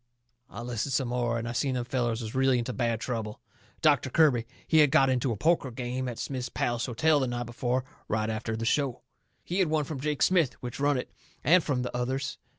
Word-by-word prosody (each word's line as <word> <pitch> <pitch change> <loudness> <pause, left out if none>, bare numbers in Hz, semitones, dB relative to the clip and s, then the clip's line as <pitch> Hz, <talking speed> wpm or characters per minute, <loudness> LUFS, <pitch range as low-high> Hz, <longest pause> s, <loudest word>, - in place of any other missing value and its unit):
I 105 - -8
listens 120 +2 -2
some 130 -2 0
more, 120 -1 0
and 115 0 -3
I - - -3
seen 130 +2 0
them 120 -1 -2
fellers 120 -2 -1
was 110 - -6
really 130 -1 +3
into 120 +1 -2
bad 115 -3 0
trouble. 115 -3 -4 0.4
Doctor 145 -3 +4
Kirby, 130 -6 +3 0.2
he 160 - +4
had 150 -2 +6
got 135 0 +4
into 125 0 +1
a 110 - -3
poker 155 - +2
game 125 +1 -3
at 120 - -6
Smith's 125 -3 -4
Palace 120 +1 -1
Hotel 150 +5 +3
the 130 - 0
night 120 0 -3
before, 120 +2 -1 0.2
right 110 0 0
after 110 0 -3
the 115 - -3
show. 135 0 0 0.4
He 180 +3 -2
had 185 - +3
won 155 -1 +1
from 145 -1 -5
Jake 150 +1 0
Smith, 170 -8 +3
which 120 +1 -7
run 145 0 +2
it, 125 - -5 0.3
and 175 +2 +5
from 130 -4 -1
the 125 - -5
others. 130 +2 -2
125 Hz, 225 wpm, -28 LUFS, 120-140 Hz, 0.4 s, had